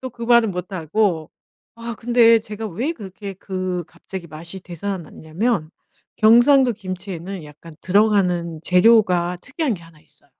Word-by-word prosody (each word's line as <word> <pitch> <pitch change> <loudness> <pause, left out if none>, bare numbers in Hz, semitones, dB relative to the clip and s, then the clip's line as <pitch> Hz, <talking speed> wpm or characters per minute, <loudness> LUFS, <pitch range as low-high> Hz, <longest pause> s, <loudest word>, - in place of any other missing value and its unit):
또 260 - -6
그 235 0 -11
말은 235 -2 +4
못하고. 180 -1 -1 0.4
아 230 0 -6
근데 230 0 +5
제가 215 0 -6
왜 235 - -2
그렇게 200 - -9
그 185 -2 -4
갑자기 170 +1 -9
맛이 165 +4 -9
되살아났냐면 175 +1 -3 0.5
경상도 240 +4 +5
김치에는 185 -3 -7
약간 155 +2 -14
들어가는 180 -5 +2
재료가 180 -2 +4
특이한 280 -1 -2
게 170 - -11
1 165 -2 -17
있어. - - -13
190 Hz, 290 characters per minute, -21 LUFS, 170-225 Hz, 0.5 s, 근데